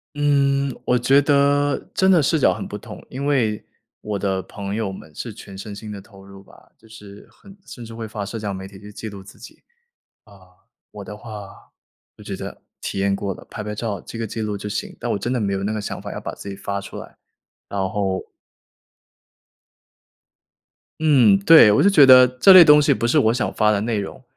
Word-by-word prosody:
嗯， 140 -1 +1
我 125 - +2
觉 135 +4 +3
得 145 0 +1
真 190 0 +3
的 175 -5 +5
视 155 +4 +1
角 140 - +3
很 - - -6
不 - - -6
同。 - - -11
因 135 +2 -6
为 120 -7 0 0.4
我 105 -1 -4
的 95 -1 -2
朋 100 +2 -7
友 105 -3 -3
们 80 -5 -13
是 - - -7
全 95 - -12
身 100 +2 -8
心 105 +1 -9
地 100 -2 -8
投 95 0 -17
入 100 0 -14
吧， - - -21
就 115 - -23
是 105 -2 -14
很 195 -1 -17
甚 120 - -11
至 115 0 -10
会 115 -1 -6
发 105 -1 -6
社 115 +3 -6
交 105 -2 -4
媒 95 0 -7
体 95 -1 -14
去 105 +2 -13
记 110 - -7
录 100 -2 -10
自 95 - -16
己。 - - -15 0.6
啊， 105 - -20 0.6
我 105 - -10
的 105 +1 -9
话， 105 -3 -11 0.4
就 - - -16
觉 - - -6
得 - - -8 0.2
体 - - -4
验 100 0 +1
过 100 0 -4
了， - - -12
拍 105 - -6
拍 105 0 -5
照 105 -2 -4
记 115 - -9
个 115 - -3
记 110 +1 -5
录 105 -1 -3
就 105 - -6
行， 105 - -5
但 - - -3
我 - - -1
真 120 +5 -3
的 125 - -1
没 100 -2 -1
有 95 - -3
那 105 - -2
个 110 - -3
想 100 - -6
法， - - -7
要 - - -6
把 - - -6
自 100 - -9
己 - - -6
发 100 0 -5
出 100 - -9
来， - - -12 0.5
然 100 - -5
后 100 -3 -2 2.8
嗯， 130 -11 +5
对， 110 -1 +7
我 - - +3
就 200 - +5
觉 160 -8 +6
得 130 -1 +9
这 125 +10 +5
类 185 -2 +10
东 150 -1 +7
西 145 -1 +3
不 115 - -2
是 130 +6 +2
我 115 -5 +3
想 120 - -2
发 105 - +2
的 105 -1 +1
内 110 0 -2
容， 100 - -7
110 Hz, 245 characters per minute, -21 LUFS, 100-130 Hz, 2.8 s, 类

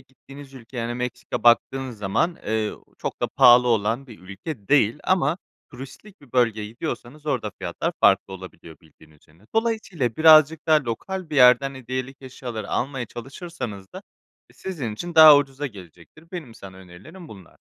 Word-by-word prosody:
gittiğiniz 135 +1 -15
ülkeye, 125 0 -13
yani 120 0 -3
Meksika 125 0 -5
baktığınız 120 0 +2
zaman, 105 - -1
eee, 110 0 -1 0.3
çok - - -5
da - - +1
pahalı 125 0 +5
olan 115 +4 0
bir 115 -4 -13
ülke 100 - -9
değil 140 -2 +3
ama 175 -3 +1 0.3
turistik 140 +11 -12
bir 140 -4 -20
bölgeye 115 -4 +1
gidiyorsanız 125 +6 -7
orada 150 - -2
fiyatlar - - -3
farklı 95 - +3
olabiliyor, 90 -3 -12
bildiğiniz 75 -1 -22
üzere. 85 +8 -25
Dolayısıyla 215 - -1
birazcık 155 0 +6
daha 155 -3 +3
lokal 175 +9 -5
bir 150 - -3
yerden 135 +2 +5
hediyelik 130 +1 -6
eşyaları 120 -4 -7
almaya 130 -2 -2
çalışırsanız 120 - -8
da - - -8 0.5
sizin 145 - -5
için 175 +8 -7
daha 155 -2 +10
ucuza 140 0 -2
gelecektir. 95 - -14
Benim 150 -11 -8
sana 95 -1 -12
önerilerim 95 - -14
bunlar. 95 - -15
125 Hz, 150 wpm, -23 LUFS, 110-150 Hz, 0.5 s, daha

